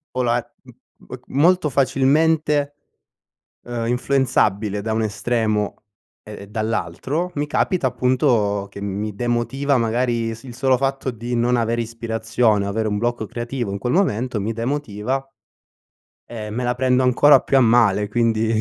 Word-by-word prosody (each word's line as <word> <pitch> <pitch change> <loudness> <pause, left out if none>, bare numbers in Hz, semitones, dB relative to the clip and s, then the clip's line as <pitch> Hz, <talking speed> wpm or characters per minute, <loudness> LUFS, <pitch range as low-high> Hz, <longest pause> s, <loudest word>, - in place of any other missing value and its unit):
m 120 - -4
molto 165 +3 +3
facilmente, 145 +2 +2 0.9
ehm 120 -1 -3
influenzabile 120 -5 +1
da 110 - -3
un 110 - 0
estremo 110 -1 -1 0.4
e 105 -1 -10
dall'altro, 115 - -2
mi 145 0 -1
capita 150 -1 +1
appunto 120 -6 +1
che 100 - -10
mi 100 +1 -4
demotiva 120 +5 0
magari 120 0 0
il - - -5
s 120 +3 -12
solo 130 +2 +1
fatto 135 0 -1
di 120 +1 -6
non 120 +1 +2
avere 115 0 0
ispirazione, 115 -2 0
o - - -3
avere 110 +1 -1
un 105 - -1
blocco 120 0 -1
creativo 120 0 -4
in 100 - -3
quel 120 +5 -2
momento 125 - 0
mi 105 +3 -2
demotiva 125 +1 -3 1.0
e 110 -3 -7
me 120 +4 -3
la 125 0 0
prendo 130 0 +2
ancora 130 +3 +5
più 135 - 0
a - - +6
male, 110 -4 +3
quindi 115 0 +1
120 Hz, 140 wpm, -21 LUFS, 110-130 Hz, 1.0 s, a